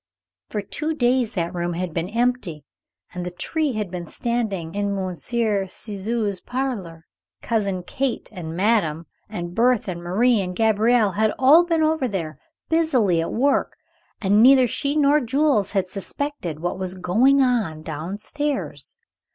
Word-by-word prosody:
For 210 Hz, -, -3 dB
two 310 Hz, +10 st, -3 dB
days 245 Hz, -3 st, +1 dB
that 170 Hz, -2 st, -2 dB
room 175 Hz, 0 st, -2 dB
had 175 Hz, -1 st, -3 dB
been 170 Hz, +2 st, -2 dB
empty 230 Hz, -, -1 dB, 0.5 s
and 180 Hz, -1 st, -4 dB
the 180 Hz, -, -3 dB
tree 295 Hz, -, -1 dB
had 210 Hz, -5 st, -3 dB
been 175 Hz, -2 st, -5 dB
standing 210 Hz, -9 st, -2 dB
in 200 Hz, 0 st, -1 dB
Monsieur 195 Hz, +2 st, -1 dB
Ciseaux's 205 Hz, +1 st, -3 dB
parlor. 210 Hz, -11 st, -4 dB, 0.4 s
Cousin 200 Hz, -5 st, -1 dB
Kate 265 Hz, +7 st, -2 dB
and 170 Hz, -5 st, -7 dB
madame 180 Hz, -6 st, +1 dB, 0.2 s
and 175 Hz, -4 st, -6 dB
Berthé 240 Hz, -3 st, +2 dB
and 170 Hz, -1 st, -5 dB
Marie 215 Hz, +6 st, +2 dB
and 180 Hz, -1 st, -4 dB
Gabriel 220 Hz, 0 st, +3 dB
had 215 Hz, +3 st, +1 dB
all 295 Hz, +7 st, +6 dB
been 330 Hz, -2 st, +1 dB
over 310 Hz, -4 st, +1 dB
there, 170 Hz, -8 st, -4 dB, 0.3 s
busily 255 Hz, -, +2 dB
at 165 Hz, -, -3 dB
work, 275 Hz, +5 st, +1 dB, 0.4 s
and 205 Hz, +1 st, +3 dB
neither 260 Hz, +1 st, +7 dB
she 280 Hz, +5 st, -1 dB
nor 295 Hz, 0 st, +4 dB
Jules 260 Hz, -5 st, +1 dB
had 195 Hz, -2 st, +1 dB
suspected 195 Hz, -, -4 dB
what 175 Hz, +2 st, -2 dB
was 185 Hz, 0 st, -3 dB
going 225 Hz, +10 st, +3 dB
on 215 Hz, -12 st, 0 dB
down 160 Hz, +5 st, -5 dB
stairs. 290 Hz, +6 st, -3 dB
210 Hz, 150 wpm, -23 LUFS, 180-250 Hz, 0.5 s, neither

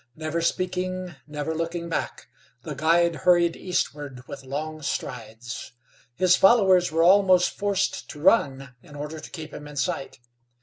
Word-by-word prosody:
Never 155 Hz, +1 st, -3 dB
speaking, 185 Hz, +1 st, -2 dB
never 150 Hz, +1 st, -3 dB
looking 165 Hz, +1 st, -3 dB
back, 165 Hz, -, -4 dB, 0.4 s
the 155 Hz, -, -5 dB
guide 165 Hz, +3 st, +2 dB
hurried 170 Hz, +2 st, +3 dB
eastward 145 Hz, -8 st, -3 dB
with -, -, -8 dB
long 155 Hz, +4 st, -5 dB
strides. 115 Hz, -5 st, -5 dB, 0.4 s
His 180 Hz, +4 st, +4 dB
followers 190 Hz, -5 st, +5 dB
were 165 Hz, +1 st, +2 dB
almost 185 Hz, 0 st, +5 dB
forced 200 Hz, -1 st, -1 dB
to 150 Hz, -, -9 dB
run 135 Hz, -, +2 dB
in 145 Hz, -, -15 dB
order 150 Hz, +2 st, -6 dB
to -, -, -10 dB
keep 160 Hz, -3 st, -8 dB
him 150 Hz, -, -8 dB
in 150 Hz, -, -11 dB
sight. 135 Hz, -1 st, -3 dB
165 Hz, 145 wpm, -25 LUFS, 145-180 Hz, 0.4 s, followers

